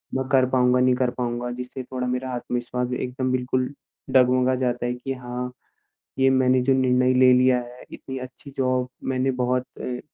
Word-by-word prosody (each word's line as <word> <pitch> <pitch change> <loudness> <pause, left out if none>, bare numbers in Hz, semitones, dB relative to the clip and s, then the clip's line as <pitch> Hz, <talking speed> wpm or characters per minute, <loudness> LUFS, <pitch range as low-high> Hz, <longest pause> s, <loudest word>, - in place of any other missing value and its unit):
मैं 130 0 -1
कर 130 -1 +5
पाऊँगा, 125 -1 +3
नहीं 125 0 +4
कर 125 -1 +1
पाऊँगा 120 0 -2
जिससे 125 +1 -6
थोड़ा 125 0 -4
मेरा 125 +1 -2
आत्मविश्वास 125 0 -3
भी 125 - -3
एकदम 130 0 -2
बिल्कुल 130 +1 -1 0.4
डग-मगा 130 0 +4
जाता 125 -1 -1
है। 120 - 0
कि 130 +2 -5
हाँ, 125 0 -5 0.7
ये 135 0 +5
मैंने 130 -1 +3
जो 135 +2 +3
निर्णय 130 -1 +3
ले 130 0 +6
लिया 125 0 +4
है 120 +1 -12
इतनी 130 - -7
अच्छी 130 +2 -10
जॉब 130 -1 +1 0.2
मैंने 130 +1 +1
बहुत 125 0 0 0.2
अ 125 -1 -4
125 Hz, 185 wpm, -24 LUFS, 125-130 Hz, 0.7 s, ले